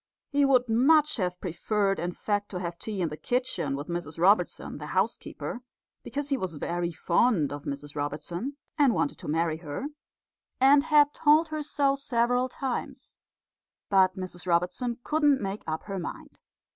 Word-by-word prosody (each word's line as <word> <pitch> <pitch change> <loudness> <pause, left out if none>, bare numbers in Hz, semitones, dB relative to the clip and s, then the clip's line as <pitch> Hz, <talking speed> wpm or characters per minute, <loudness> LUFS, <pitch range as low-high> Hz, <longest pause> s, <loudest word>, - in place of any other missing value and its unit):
He 285 0 +3
would 255 -2 +4
much 295 +7 +4
have 180 -3 -2
preferred, 195 +3 0
in 175 +1 -2
fact, 205 +2 -2
to 180 - -4
have 170 -1 -5
tea 205 -4 -3
in 165 - 0
the 150 - -7
kitchen 250 - -1
with 145 +2 -6
Mrs 170 -3 -4
Robertson, 180 -4 +2
the 150 - -7
housekeeper, 200 +6 -2 0.4
because 285 0 -4
he 275 - +1
was 185 -8 -3
very 170 +3 -2
fond 170 - +2
of 145 0 -7
Mrs 145 +1 -6
Robertson, 155 - -4 0.2
and 275 -5 +5
wanted 145 - -1
to - - -8
marry 160 +1 0
her, 160 - -5 0.7
and 280 +3 +6
had 295 -2 +5
told 310 +2 +4
her 310 -1 -3
so 285 -2 +1
several 245 -1 +1
times. 260 -1 -5 0.7
But 190 -1 +4
Mrs 185 -1 -6
Robertson 180 +8 0
couldn't 295 -3 +3
make 195 +1 -4
up 160 0 -3
her 195 -2 -4
mind. 170 - -8
200 Hz, 165 wpm, -28 LUFS, 170-270 Hz, 0.7 s, and